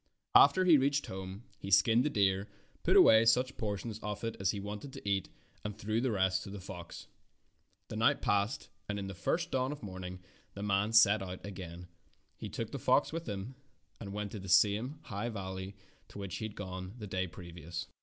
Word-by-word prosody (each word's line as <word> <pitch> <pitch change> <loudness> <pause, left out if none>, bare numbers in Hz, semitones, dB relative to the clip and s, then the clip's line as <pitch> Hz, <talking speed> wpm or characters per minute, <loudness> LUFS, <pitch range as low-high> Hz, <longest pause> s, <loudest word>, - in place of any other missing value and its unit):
After 185 0 +7
he 165 -5 +7
reached 140 +1 +1
home 95 +3 -7 0.2
he 100 - -6
skinned 110 +5 +5
the 150 - +1
deer, 100 -4 +2 0.3
put - - +4
away 110 0 +8
such 125 +3 +3
portions 105 +1 -4
of 105 0 -5
it 115 -1 -2
as 95 -2 +1
he 100 - -1
wanted 105 +6 -6
to - - -9
eat, 100 -2 0 0.3
and 105 -1 -5
threw 110 +2 -1
the 130 - +1
rest 95 -3 +1
to - - -8
the 100 0 -7
fox. 90 -2 -9 0.8
The - - -6
night - - +3
passed, 100 +4 0 0.2
and 105 - -1
in 100 - -4
the 95 - -5
first 165 - -1
dawn 130 +1 0
of 145 - -7
morning 90 -2 -7 0.3
the 100 - -5
man 100 -1 +2
again 110 - -5
set 110 -2 +6
out. 95 -1 -6 0.9
He - - -7
took - - -4
the - - -4
fox - - +3
with 165 -4 -4
him 100 +5 -5 0.5
and 100 -3 -7
went 105 0 -4
to 105 - -6
the 95 0 -8
same 110 - +3
high 105 -1 -3
valley 95 -2 -5 0.3
to - - -12
which 100 -2 -5
he 110 - -4
had 110 - -7
gone 95 0 -6
the 110 - -7
day 95 -1 -2
previous. 85 -2 -7
100 Hz, 205 wpm, -32 LUFS, 95-115 Hz, 0.9 s, away